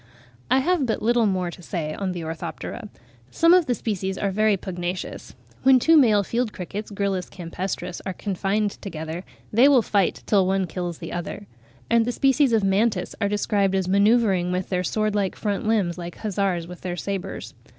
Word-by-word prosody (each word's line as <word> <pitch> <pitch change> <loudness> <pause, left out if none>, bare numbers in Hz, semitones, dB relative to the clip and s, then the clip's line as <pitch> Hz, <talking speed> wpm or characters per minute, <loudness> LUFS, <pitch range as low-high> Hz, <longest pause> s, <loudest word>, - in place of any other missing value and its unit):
I 260 +1 +4
have 330 -2 +1
but 220 - -1
little 235 0 +3
more 185 -3 -1
to 180 - -12
say 160 -3 -3
on 195 +1 -3
the 175 -2 -5
Orthoptera. 160 +1 -6 0.4
Some 335 +1 +4
of 360 -3 +5
the 245 - +1
species 190 -4 -3
are 200 - -1
very 215 +1 +2
pugnacious: 180 -1 -5 0.3
when 265 0 +6
two 320 +6 +4
male 220 -9 +5
field 235 +2 -1
crickets 200 +3 -6
(Gryllus 195 -3 -2
campestris) 180 0 -5
are 190 - -3
confined 200 +2 -1
together, 160 -1 -5 0.3
they 240 +6 +6 0.2
fight 200 -4 0
till 195 -3 +3
one 190 0 +1
kills 175 0 -4
the - - -7
other; 175 +4 -5 0.4
and 230 0 +4
the 245 - -1
species 270 +1 +3
of 220 -3 +3
Mantis 195 -1 +1
are 200 - +2
described 200 -1 +1
as 190 -2 0
manoeuvring 200 -2 +3
with 180 0 -2
their 180 -1 0
sword 215 +3 0
like 200 -2 0
front 205 0 -2
limbs, 195 -6 +1
like 175 0 -6
hussars 195 -5 -1
with 180 +1 -10
their 180 -1 -4
sabres. 195 0 -5
195 Hz, 180 wpm, -24 LUFS, 180-220 Hz, 0.4 s, when